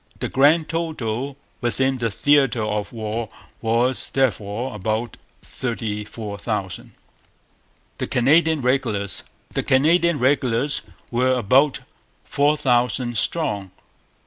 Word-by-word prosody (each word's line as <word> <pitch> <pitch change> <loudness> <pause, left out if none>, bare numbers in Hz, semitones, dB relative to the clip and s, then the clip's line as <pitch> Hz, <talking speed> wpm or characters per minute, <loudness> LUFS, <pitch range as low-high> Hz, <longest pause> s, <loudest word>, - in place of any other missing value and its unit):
The - - -3
grand 150 +4 +4
total 140 -6 -3 0.2
within 130 +2 0
the 115 -1 0
theatre 135 0 +3
of 105 -1 -2
war 110 -1 -4 0.3
was 120 +3 +1
therefore 120 -2 -1
about 110 +3 -2 0.3
thirty 110 -4 -4
four 105 -2 -7
thousand. 100 -5 -4 1.0
The - - -2
Canadian 155 +4 +3
Regulars. 110 - 0 0.3
The - - 0
Canadian 165 +5 +3
regulars 130 0 +1 0.3
were 130 +2 +2
about 130 +5 +3 0.4
four 145 +2 +2
thousand 120 -2 +1
strong. 105 - 0
125 Hz, 105 wpm, -22 LUFS, 110-140 Hz, 1.0 s, grand